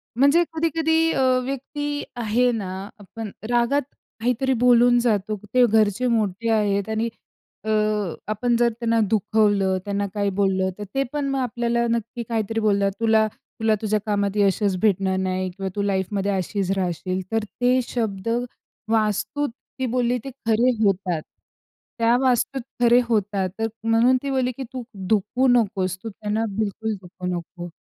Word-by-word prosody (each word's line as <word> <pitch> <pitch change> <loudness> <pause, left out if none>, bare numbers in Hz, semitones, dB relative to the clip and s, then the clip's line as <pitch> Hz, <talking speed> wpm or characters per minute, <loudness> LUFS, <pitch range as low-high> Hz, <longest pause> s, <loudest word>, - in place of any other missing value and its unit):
म्हणजे 280 +7 +5
कधी-कधी 325 0 +2
अ, - - 0 0.2
व्यक्ती 290 +2 -4
आहे 240 +1 +2
ना, 205 -6 -3 0.3
आपण 210 +1 -8 0.2
रागात 240 +4 +2 0.4
काहीतरी 250 +3 +1
बोलून 245 0 +6
जातो. 215 -3 0 0.2
ते 250 -1 +6
घरचे 220 +1 +2
मोठे 225 -2 0
आहेत 205 -2 +1
आणि 220 +1 0 0.5
अ, 220 - -4 0.6
आपण 240 +3 +1
जर 240 0 +4
त्यांना 230 -1 +1
दुखवलं, 205 -3 +2
त्यांना 200 0 -1
काही 205 -1 0
बोललं, 190 -1 +2
तर 210 - -6
ते 270 - +2
पण 295 -1 -1
मग 275 0 0
आपल्याला 235 -1 0
नक्की 235 +1 -2
काहीतरी 225 -1 -1
बोलतात. 200 -2 +2
तुला, 220 -1 +3
तुला 220 -1 -1
तुझ्या 215 -1 +1
कामात 205 -1 0
यशच 200 -1 +2
भेटणार 195 -3 +2
नाही 185 0 -1
किंवा 190 +1 -4
तू 205 - -1
लाईफमध्ये 200 0 0
अशीच 190 0 -1
राहशील. 185 0 -2
तर 225 -1 +1 0.2
ते 250 +1 +4
शब्द 220 -3 -2 0.6
वास्तूत, 215 +6 0 0.3
ती 260 - 0
बोलली 245 0 +1
ते 275 - -6 0.2
खरे 230 +3 +3
होतात. 185 -5 +1 0.8
त्या 230 +1 +4
वास्तूत 260 +1 +1 0.2
खरे 240 0 +6
होतात. 205 -4 0
तर 225 - +1 0.2
म्हणून 230 +3 +4
ती 280 - -2
बोलली, 260 -2 +1
की 270 - -4
तू 255 -1 -4 0.2
दुखवू 220 +6 +2
नकोस. 200 -7 +2
तू 225 - -4
त्यांना 215 +2 -2
बिलकुल 220 +1 -1
दुखवू 180 0 -8
नको. 175 +1 -7
220 Hz, 150 wpm, -23 LUFS, 200-245 Hz, 0.8 s, बोलून